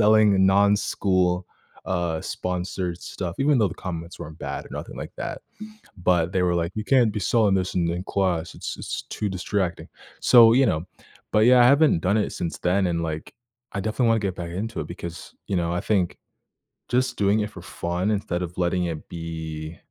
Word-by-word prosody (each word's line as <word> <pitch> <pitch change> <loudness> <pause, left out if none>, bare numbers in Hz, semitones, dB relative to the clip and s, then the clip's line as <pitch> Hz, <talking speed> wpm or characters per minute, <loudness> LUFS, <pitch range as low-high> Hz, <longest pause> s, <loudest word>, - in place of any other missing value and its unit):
selling 105 -3 +5
non-school, 95 -2 +2 0.4
uh, 85 -3 -1
sponsored 90 -1 -3
stuff, 90 -1 -5
even 140 -1 +3
though 105 -3 +3
the - - -8
comments 85 -1 -6
weren't 80 +1 -9
bad - - -5
or - - -16
nothing - - -7
like - - -7
that. - - -5 0.6
But 90 -1 +2
they 95 - +2
were 90 -1 +2
like, 85 +1 -1
"You 110 - -2
can't 125 -4 +4
be 105 - -2
selling 105 -1 +3
this 95 -1 -1
in 85 -2 +1
in 90 +2 -3
class. 90 -5 -1
It's-it's - - -5
too 105 -2 -2
distracting." 95 0 -2 0.3
So, 115 -2 +8
you 135 +1 +5
know? 80 -5 0 0.5
But, 105 - +3
yeah, 125 0 +7
I 120 - +7
haven't 140 - +5
done 100 +4 +2
it 105 - 0
since 85 - -4
then, 95 +1 +2
and, 85 -1 -1
like, 80 -1 -5 0.4
I 100 - -2
definitely 110 +4 0
wanna 115 - +3
get 95 -2 -2
back 85 -1 -5
into 110 +6 -4
it 75 - -6
because, 85 0 -8
you 100 - -1
know, 85 -1 0
I 90 - 0
think 95 -5 0 0.7
just 125 0 +1
doing 105 +1 +3
it 105 - -2
for - - -10
fun 90 +4 -2
instead 95 -4 -1
of 90 0 -7
letting 90 0 +1
it 80 -3 -5
be, 80 -1 -6
90 Hz, 195 wpm, -24 LUFS, 85-105 Hz, 0.7 s, So